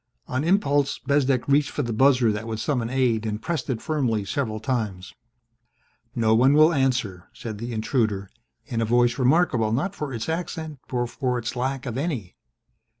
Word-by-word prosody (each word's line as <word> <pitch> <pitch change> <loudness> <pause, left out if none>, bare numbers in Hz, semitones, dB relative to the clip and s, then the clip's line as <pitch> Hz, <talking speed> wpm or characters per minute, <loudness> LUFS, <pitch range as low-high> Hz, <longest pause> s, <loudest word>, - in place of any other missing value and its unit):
On 130 +3 -1
impulse, 145 -6 +2
Bezdek 135 -3 +1
reached 140 +1 +3
for 145 - -2
the 120 -2 -3
buzzer 125 -1 +4
that 105 +2 -4
would 110 -1 -4
summon 120 -2 -1
aid 125 -4 +1
and 105 -1 -3
pressed 155 0 -3
it 120 -4 -2
firmly 125 -10 0
several 110 0 -2
times. 105 -6 -3 1.0
"No 110 -2 +3
one 130 +5 +5
will 155 +2 +6
answer," 125 - -1
said 110 -3 -7
the 120 +2 -5
intruder 110 -3 0 0.4
in 115 -1 -2
a - - +2
voice 120 +2 +2
remarkable 130 -5 +3
not 155 - 0
for 150 -6 -5
its 115 -3 -4
accent 160 -3 -4
but 120 -1 -1
for 125 -3 -1
its 120 +1 -4
lack 130 +2 -2
of 125 0 -3
any. 135 - -3
125 Hz, 175 wpm, -24 LUFS, 110-140 Hz, 1.0 s, will